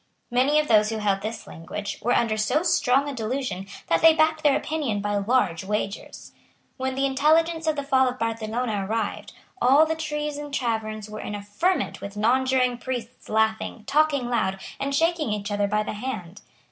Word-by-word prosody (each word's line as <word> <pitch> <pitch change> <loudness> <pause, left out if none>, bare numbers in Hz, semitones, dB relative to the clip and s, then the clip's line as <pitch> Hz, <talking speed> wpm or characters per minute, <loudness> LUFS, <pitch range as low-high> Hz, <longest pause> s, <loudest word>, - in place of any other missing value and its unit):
Many 260 +5 +3
of 305 - 0
those 215 -1 +4
who 225 - -2
held 200 -2 0
this 220 +2 -5
language 200 +5 -6
were 240 +3 +1
under 230 -2 +2
so 250 +9 +1
strong 275 -5 +2
a 285 - -3
delusion 225 -5 -3 0.2
that 165 - +1
they 325 -1 +7
backed 315 0 +2
their 290 -2 +4
opinion 285 -10 -2
by 205 0 -1
large 200 -5 +1
wagers. 205 0 -4 0.5
When 260 0 -2
the 270 +1 +1
intelligence 320 +4 +2
of 310 - +2
the 285 - -3
fall 265 -2 +3
of 250 - -6
Barcelona 225 -1 -2
arrived, 220 +1 -3 0.3
all 275 +5 +6
the 320 - -1
treason 300 -2 -4
taverns 220 -5 -2
were 215 0 -7
in 210 - -5
a 205 - -6
ferment 340 - -1
with 200 +1 -7
nonjuring 250 +2 +2
priests 255 -1 -6
laughing, 220 0 0
talking 290 -3 +2
loud, 195 -6 0 0.2
and 275 0 -1
shaking 325 -4 +1
each 205 0 -3
other 205 0 +1
by 210 +1 +1
the - - -4
hand. 205 -5 -6
245 Hz, 185 wpm, -25 LUFS, 210-285 Hz, 0.5 s, they